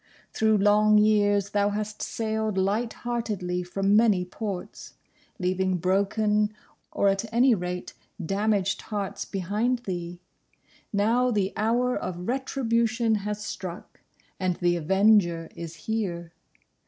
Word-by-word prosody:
Through 220 -1 +3
long 210 +1 +4
years 205 -2 +3
thou 205 0 +2
hast 210 +1 -4
sailed 220 -2 -2
light 210 +5 0
heartedly 210 -7 -2
from 195 +3 +1
many 210 -5 +4
ports, 195 0 -6 0.4
leaving 185 0 0
broken, 210 +4 +1 0.4
or, 200 - +1
at 195 +3 -2
any 245 +2 +4
rate, 180 -2 -4 0.3
damaged 195 +2 0
hearts 200 -2 -4
behind 215 +6 -1
thee. 175 -2 -5 0.7
Now 230 +5 +2
the 205 -5 0
Hour 240 +4 +1
of 180 0 -5
Retribution 235 -3 0
has 210 +1 -4
struck, 180 -3 -7 0.4
and 185 -2 0
the 175 0 +1
Avenger 175 -1 +3
is 165 -1 -7
here. 180 -7 -3
205 Hz, 115 wpm, -26 LUFS, 185-220 Hz, 0.7 s, long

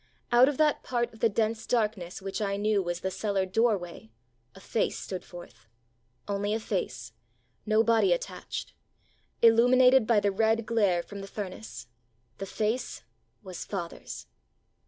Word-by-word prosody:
Out 245 +3 +6
of 290 - -3
that 305 -1 +3
part 240 -2 -2
of 220 - -15
the 230 - +3
dense 220 +1 -1
darkness 210 -7 -1
which 195 +3 -4
I 200 -1 -1
knew 210 0 +2
was 175 -1 -3
the 190 - -2
cellar 200 -1 -1
doorway 185 - -1 0.5
a - - -12
face 215 - -1
stood 185 -2 -6
forth 120 -11 -13 0.6
вҖ" 205 - -2
only 205 +1 -1
a - - -1
face, 125 - -4 0.5
no 215 +1 +4
body 230 - +3
at - - +2
tachedвҖ" - - -7 0.7
illuminated 250 +1 +6
by 230 -3 +4
the 205 0 +1
red 220 +2 +1
glare 200 -7 +2
from 200 +2 -9
the 195 - -8
furnace. 125 - -7 0.5
The 195 - -4
face 220 +6 -2 0.4
was 185 -3 -7
father's 175 -4 -6
210 Hz, 155 wpm, -28 LUFS, 185-230 Hz, 0.7 s, Out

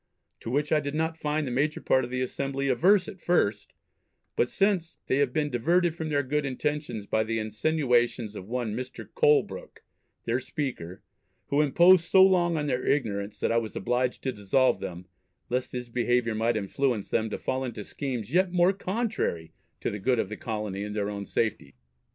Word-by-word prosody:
to - - -7
which 145 +4 0
I 155 - +4
did 145 0 -4
not 160 +1 -1
find 150 0 -1
the 130 - -3
major 145 +5 0
part 130 - +2
of 120 - -5
the 130 0 -1
Assembly 135 +1 -2
averse 180 - +4
at 190 - -9
first, 105 -12 +1 0.6
but 120 - +2
since, 195 -4 0
they 130 - +1
have 140 -3 +2
been 150 +1 -1
diverted 170 +8 +2
from 160 -2 -4
their 145 -1 +1
good 150 +3 -1
intentions 135 -4 -3
by 110 +1 +1
the 115 +1 -2
insinuations 120 -1 0
of 95 - -8
one 120 -2 -2
Mr. 130 +2 -6
Colebrooke, 470 +1 +1 0.4
their 120 +2 +1
Speaker, 125 - -5 0.5
who 145 +1 +3
imposed 170 +4 +5
so 190 +2 +6
long 175 -3 +3
on 150 - -1
their 130 -3 -1
ignorance, 105 -7 -1
that - - 0
I 115 - +2
was 115 -2 -2
obliged 125 +1 -1
to 130 - 0
dissolve 125 +5 +2
them, 90 0 -6 0.5
lest 125 +1 -1
his 125 -1 -5
behaviour 120 -1 +1
might 110 +1 +1
influence 110 +2 -1
them 110 -1 +1
to - - -3
fall 130 0 -2
into 115 -5 -5
schemes 125 -3 -5
yet 185 0 +3
more 180 +1 +4
contrary 185 - -2 0.3
to - - -1
the 105 - -5
good 125 +5 +1
of 110 - -1
the 105 - -5
Colony 105 -3 -4
and 105 0 -5
their 105 -1 -1
own 100 -1 -6
safety. 105 - -2
130 Hz, 190 wpm, -27 LUFS, 110-155 Hz, 0.6 s, so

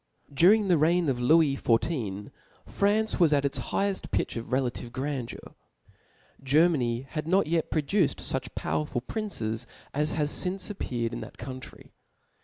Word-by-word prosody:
Under 200 +7 +5
the 175 -4 +4
reign 170 +1 +3
of 125 -2 -1
Lewis 145 +1 +4
XIV. 115 - 0 0.3
France 210 +2 +1
was 165 -4 +5
at 140 -1 +2
its 140 - -1
higheft 200 -1 -2
pitch - - -1
of 115 +1 -6
relative 125 -2 -1
grandeur. 130 -1 -5 0.9
Germany 135 -4 +2
had 155 0 -4
not 190 +2 +3
yet 165 +1 0
produced 160 +2 +1
fuch 130 -1 -2
powerful 135 -5 -2
princes 120 - -3 0.3
as 150 +2 0
have 150 -1 0
lince 190 +5 -2
appeared 120 - -3
in 120 - -4
that - - -10
country. 130 -1 -9
150 Hz, 145 wpm, -28 LUFS, 125-175 Hz, 0.9 s, Under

